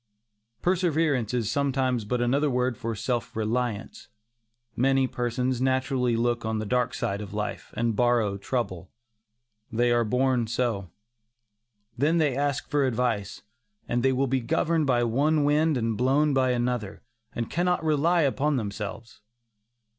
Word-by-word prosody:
Perseverance 160 - +1
is 115 -3 -1
sometimes 130 -4 0
but 125 +3 -1
another 140 +5 +2
word 125 -1 0
for 115 -2 -4
self 120 +2 -3
reliance. 115 - -2 0.7
Many 135 +1 +3
persons 125 0 -2
naturally 130 -2 +1
look 120 0 0
on 110 0 -1
the 110 - -3
dark 125 +4 0
side 100 +1 -2
of 105 0 -8
life, 105 0 -4
and 115 -1 0
borrow 120 -4 +2
trouble. 95 -5 -3 0.8
They 120 +2 +2
are 120 0 +3
born 125 +1 +1
so. 115 -5 -1 1.1
Then 155 +5 +3
they 150 -5 +2
ask 145 0 -1
for 145 -2 +1
advice, 115 -5 -2 0.4
and 120 0 0
they 135 +2 +3
will 130 +1 +1
be 130 0 0
governed 155 +6 +1
by 120 -2 +3
one 145 +6 +2
wind 150 +1 +2
and 115 -2 -1
blown 140 +5 +2
by 130 -1 +2
another, 120 -4 -2 0.3
and 115 -1 -2
cannot 175 0 0
rely 160 +2 +2
upon 140 +3 +1
themselves. 105 0 -5
125 Hz, 145 wpm, -26 LUFS, 115-140 Hz, 1.1 s, Many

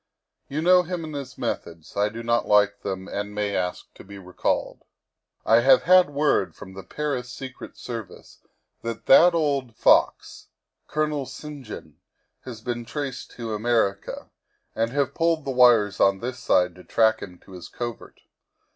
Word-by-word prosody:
You 150 +3 -3
know 180 +1 +6
him 180 -1 -5
and 155 -1 -7
his 140 -3 -7
methods; 85 -1 -5
I 100 +1 +1
do 115 +2 -8
not 120 0 0
like 105 -1 +3
them 95 -1 -5
and 105 +1 -5
may 105 -1 -1
ask 90 -1 -3
to - - -14
be 100 +1 -11
recalled. 90 -1 -2 0.3
" - - -52
1 115 +1 +5
have 130 +1 +5
had 185 -2 +6
word 140 - +1
from 95 -1 -11
the 95 - -8
Paris 130 +3 -4
Secret 130 -1 -9
Service 115 -6 -9 0.4
that 115 -1 -6
that 175 -1 +7
old 140 -7 -1
fox, - - +2 0.4
Colonel 150 -3 -1
St. 150 -2 -9
John, 105 - -10 0.5
has 120 -4 -8
been 120 0 -4
traced 130 +2 -5
to 115 -2 -5
America, 105 -3 -1 0.4
and 115 +1 0
have 140 +2 -1
pulled 165 -2 0
the 135 - -2
wires 120 -6 +4
on 95 0 +4
this 125 +4 -5
side 90 -7 +2
to 90 - -13
track 110 +6 +2
him 90 -2 -9
to 95 - -19
his 90 -2 -9
covert. 120 -2 -7
120 Hz, 170 wpm, -24 LUFS, 100-140 Hz, 0.5 s, that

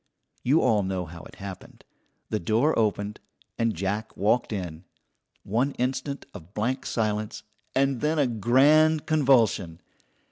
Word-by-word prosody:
You 145 +6 +3
all 110 -5 +3
know 95 -2 -2
how 85 +1 -10
it - - -13
happened. 95 -2 -10 0.5
The 110 - 0
door 115 - +2
opened 105 -1 0 0.4
and 115 -1 +1
Jack 100 +5 -3
walked 110 +5 +1
in. 90 -5 -5 0.6
One 125 +7 0
instant 130 +3 -2
of 85 +5 -12
blank 125 +5 -1
silence, 110 -2 -2 0.3
and 135 -2 +2
then 155 +2 +1
a 145 - +4
grand 140 +7 +4
convulsion. 120 - +2
110 Hz, 135 wpm, -26 LUFS, 100-135 Hz, 0.6 s, a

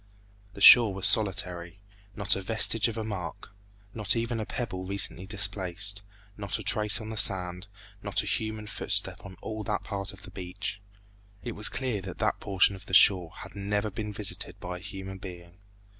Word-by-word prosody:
The 100 - -10
shore 110 -3 +8
was 95 0 +1
solitary; 90 -4 +2 0.4
not 100 -1 +1
a 95 - -4
vestige 110 +2 +4
of 115 -1 -5
a 110 - -3
mark. 90 -8 -7 0.4
Not 105 -2 +1
even 115 0 -2
a 110 - -5
pebble 100 -7 -5
recently 95 0 0
displaced; 100 -1 -1 0.3
not 100 -1 -4
a 110 - -7
trace 105 +2 +3
on 110 -1 -8
the 110 - -7
sand; 90 -2 +3 0.3
not - - +2
a - - -8
human 110 -1 -3
footstep 105 - 0
on 95 -2 -11
all 110 -1 -5
that 105 - -3
part 100 -2 -5
of 100 0 -15
the - - -12
beach. 95 +2 -6 0.6
It 120 - -5
was 105 -1 -1
clear 125 -6 -3
that 95 -1 -9
that - - -1
portion 100 0 +2
of 95 - -13
the 95 - 0
shore 90 -4 +5
had - - -13
never 105 +1 -2
been 105 +1 -5
visited 105 -1 -3
by 90 0 -6
a - - -13
human 95 -1 -8
being. 90 -1 -11
100 Hz, 190 wpm, -27 LUFS, 95-105 Hz, 0.6 s, shore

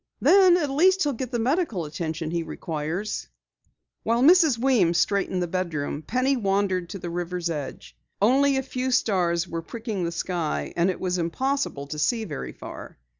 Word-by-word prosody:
Then 375 -2 +6
at 300 -5 -1
least 375 +7 +4
he'll 290 -2 0
get 255 +1 -4
the 240 - -2
medical 240 - 0
attention 160 +1 -4
he 170 0 -1
requires." 165 - -4 0.7
While 235 +2 +1
Mrs. 320 -4 +6
Weems 230 -9 +3
straightened 190 -1 +1
the - - -2
bedroom, 165 -5 -3
she 255 +3 +2
wandered 195 -4 0
to 200 - -6
the 175 -2 -6
river's 175 0 -3
edge. 150 -4 -6 0.2
Only 270 +6 +4
a 265 - 0
few 260 0 -3
stars 185 -8 +1
were 165 -1 -4
pricking 220 +1 -5
the 170 - -1
sky, 170 -2 -2
and 170 +2 +2
it 185 - -3
was 180 -1 -1
impossible 255 - -1
to 150 +2 -6
see 225 +7 +1
very 150 -8 -6
far. - - -10
190 Hz, 175 wpm, -25 LUFS, 170-260 Hz, 0.7 s, Then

